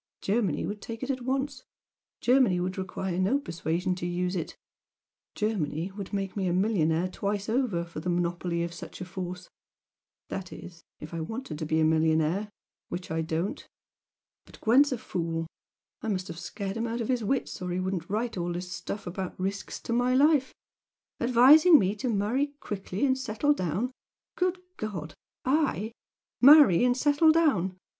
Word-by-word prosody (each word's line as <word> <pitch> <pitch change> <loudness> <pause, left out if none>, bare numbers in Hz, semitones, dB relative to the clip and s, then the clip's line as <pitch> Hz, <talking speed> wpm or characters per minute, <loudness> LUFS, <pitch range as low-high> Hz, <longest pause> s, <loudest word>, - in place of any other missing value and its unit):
Germany 200 -5 0
would 205 0 -5
take 230 +2 -7
it 265 - 0
at 260 -1 -4
once 265 +1 -2 0.6
Germany 245 -8 +4
would 185 +1 -2
require 185 -1 -3
no 195 +9 +3
persuasion 170 - -2
to 175 - -3
use 180 +1 -1
it! 170 - -4 0.8
Germany 185 -5 -1
would 195 -1 -7
make 195 -2 -3
me 195 -3 -1
a 175 - +1
millionaire 180 -4 +2
twice 200 +2 -3
over 220 -8 0
for 170 -2 -7
the 180 - -3
monopoly 175 0 -1
of 170 0 -4
such 170 - -9
a 185 - -5
force! 180 0 -6 0.8
that 190 -1 -5
is, 170 -1 -11 0.2
if 155 +2 -9
I 165 - -3
wanted 195 - -5
to 155 - -3
be 160 +1 +1
a - - +3
millionaire, 160 +5 +2 0.4
which 175 -1 -5
I 160 0 0
don't. 165 +4 -2 0.8
But - - -15
Gwent's 275 +6 +4
a 255 - 0
fool 165 -5 -3 0.6
I - - -5
must 190 -3 -2
have 165 0 -6
scared 195 +2 -5
him 230 +1 -1
out 230 +1 -3
of 225 - -2
his 250 -3 0
wits, 245 -2 -1
or 180 - -3
he 180 +1 -1
wouldn't 185 -2 -3
write 225 +2 -2
all 175 0 -2
this 180 +1 -5
stuff 205 - -5
about 185 +1 -5
risks 195 +1 -3
to 230 - -3
my 245 +1 +2
life, 285 -1 +4 0.7
advising 270 +8 +7
me 195 -3 +1
to 245 +5 -2
marry 240 +8 0
quickly 200 +4 -3
and 260 -1 +3
settle 260 +3 +1
down! 195 - -2 0.4
Good 365 0 +1 0.2
God! 180 -8 -5 0.3
I? 260 -6 +1 0.5
Marry 270 - +8
and 245 0 +2
settle 295 +3 +4
down? 215 - +2
195 Hz, 175 wpm, -28 LUFS, 175-245 Hz, 0.8 s, Marry